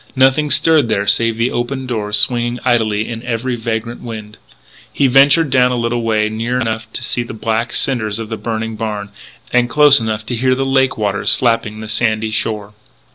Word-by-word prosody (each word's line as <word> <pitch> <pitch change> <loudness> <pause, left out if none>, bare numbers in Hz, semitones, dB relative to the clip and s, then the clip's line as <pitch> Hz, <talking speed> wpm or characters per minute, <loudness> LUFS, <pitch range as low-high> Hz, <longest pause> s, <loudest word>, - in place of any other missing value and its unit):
Nothing 135 +3 +3
stirred 150 -2 +4
there 100 -2 0
save 115 +3 +2
the 115 +2 0
open 130 +2 -3
doors 105 -4 -1
swinging 120 +3 +1
idly 110 -4 +1
in 115 -1 -6
every 120 +1 -3
vagrant 115 0 -4
wind. 110 -2 -8 0.5
He 140 - 0
ventured 140 +3 +4
down 125 -1 +3
a - - -1
little 120 0 -1
way 110 -2 0
near 115 +3 -3
enough 110 -2 -3
to - - -4
see 120 - -1
the 120 -1 -7
black 115 +2 -2
cinders 110 -6 0
of 115 -1 -6
the 115 - -3
burned 110 -1 -5
barn, 105 -2 -4 0.4
and 125 0 +2
close 145 -1 +6
enough 110 -1 -3
to 120 - -3
hear 130 +2 +1
the 135 +1 -2
lake 135 0 +1
waters 100 -2 +1
slapping 115 -3 0
the 110 - -7
sandy 110 0 0
shore. 110 -2 -3
115 Hz, 190 wpm, -16 LUFS, 110-125 Hz, 0.5 s, close